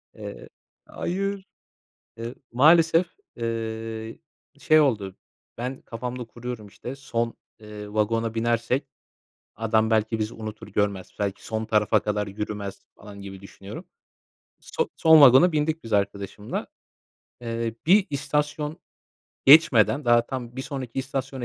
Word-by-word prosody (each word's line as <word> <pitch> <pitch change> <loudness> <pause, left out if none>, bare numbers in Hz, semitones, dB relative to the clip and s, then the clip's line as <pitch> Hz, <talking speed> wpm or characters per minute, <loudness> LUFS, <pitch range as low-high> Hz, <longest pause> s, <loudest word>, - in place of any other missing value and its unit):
Eee. - - -9 0.4
Hayır! 195 +2 -3 0.7
Eee, 115 +2 -6 0.2
maalesef, 165 +6 +5 0.3
eee, 115 -1 -4 0.4
şey 155 0 +5
oldu; 105 -10 0 0.4
ben 125 +2 -4
kafamda 125 +2 -5
kuruyorum 120 -1 -7
işte, 125 +6 -8
son, 120 -4 -2 0.3
eee, 105 -1 -9
vagona 115 +1 0
binersek, 120 +4 0 0.7
adam 110 0 +1
belki 110 0 +1
bizi 110 +1 -2
unutur 110 0 -8
görmez, 100 -2 -1
belki 100 -1 -3
son 110 0 -3
tarafa 105 0 +3
kadar 105 0 -2
yürümez, 100 -1 -5
falan 100 -1 -12
gibi 95 -1 -9
düşünüyorum. 100 - -10 0.7
So 475 - -2
son 160 -2 +7
vagona 140 +6 +8
bindik 155 +1 -1
biz 115 - -5
arkadaşımla. 100 0 -2 0.7
Eee, 115 -1 -3
bir 190 +4 +5
istasyon 150 +1 -2 0.7
geçmeden 140 -2 +6
daha 120 -1 +4
tam, 125 -2 -6
bir 130 - -3
sonraki 135 -4 -5
istasyona 135 -1 -3
115 Hz, 120 wpm, -25 LUFS, 110-135 Hz, 0.7 s, vagona